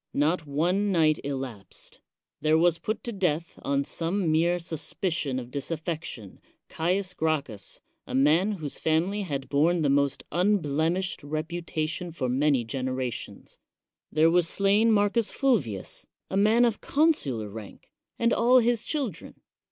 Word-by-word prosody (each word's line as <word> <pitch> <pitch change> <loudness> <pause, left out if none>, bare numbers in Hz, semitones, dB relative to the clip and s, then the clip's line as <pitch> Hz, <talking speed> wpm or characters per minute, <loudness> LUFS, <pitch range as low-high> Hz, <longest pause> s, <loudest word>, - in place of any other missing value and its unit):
Not 155 +2 +1
one 180 +8 +1
nigt 155 -4 +3
elapsed. 130 -8 -7 0.4
There 155 +1 +3
was 170 0 +3
put 215 - -3
to 240 - -3
death, 170 -5 -2
on 140 0 0
some 170 +3 -1
mei 170 +3 +2
suspicion 160 -3 -2
of 125 -1 -6
disaffection, 155 - -5 0.3
Caius 185 +3 -1
Gracchus, 145 - -3 0.3
a - - -4
ma 150 +7 +4
whose 155 -6 -6
family 175 +6 +1
had 140 -8 -4
borne 160 +4 +2
the 140 - +3
most 140 -1 +1
unblemishe 175 -1 +1
reputation 160 +2 -3
for 140 -6 -3
many 135 0 +2
generations. 130 +1 -4 0.5
There 160 +1 +4
wj 175 0 +3
slain 200 +5 +3
Marcus 210 +1 +2
Fulvius, 185 - 0 0.2
a - - -1
man 215 +5 +4
of 230 -3 -1
consular 155 - +1
rani 105 -1 -9 0.4
and 235 0 +2
all 245 +2 +5
his 240 -2 +2
children. 270 - -4
160 Hz, 135 wpm, -27 LUFS, 140-195 Hz, 0.5 s, all